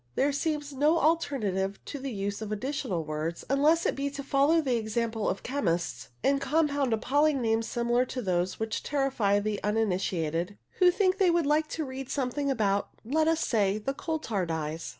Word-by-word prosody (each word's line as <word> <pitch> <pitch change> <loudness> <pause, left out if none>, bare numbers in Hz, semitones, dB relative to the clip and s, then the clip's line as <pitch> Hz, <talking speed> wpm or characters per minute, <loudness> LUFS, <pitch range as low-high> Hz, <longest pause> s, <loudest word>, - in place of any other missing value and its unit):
There 285 +2 +2
seems 295 0 -2
no 300 +5 +3
alternative 220 - 0
to 285 - -6
the 270 0 -4
use 200 -1 -3
of 215 -1 -5
additional 215 - -2
words, 155 +2 -4
unless 305 +4 +3
it - - +1
be 280 +1 -1
to 280 0 -6
follow 280 +4 +3
the 265 -6 +1
example 225 0 -1
of 190 - -3
chemists, 175 -11 -2
and 275 0 +2
compound 285 -2 +1
appalling 285 +6 +2
names 225 -1 +1
similar 240 +1 +1
to 255 0 -5
those 180 -1 0
which 220 0 -2
terrify 270 -8 +1
the 205 0 -2
uninitiated 185 -4 -1 0.2
who 365 - +7
think 375 +1 +2
they 380 -2 +5
would 340 -2 +2
like 305 +2 +2
to 315 0 -3
read 265 0 -6
something 280 +1 -1
about, 205 -6 +1 0.2
let 310 +6 +1
us 325 0 +2
say, 205 -3 +2
the 245 +6 -3
coal 320 +3 -3
tar 205 - -2
dyes. 160 0 -3
250 Hz, 185 wpm, -28 LUFS, 205-290 Hz, 0.2 s, who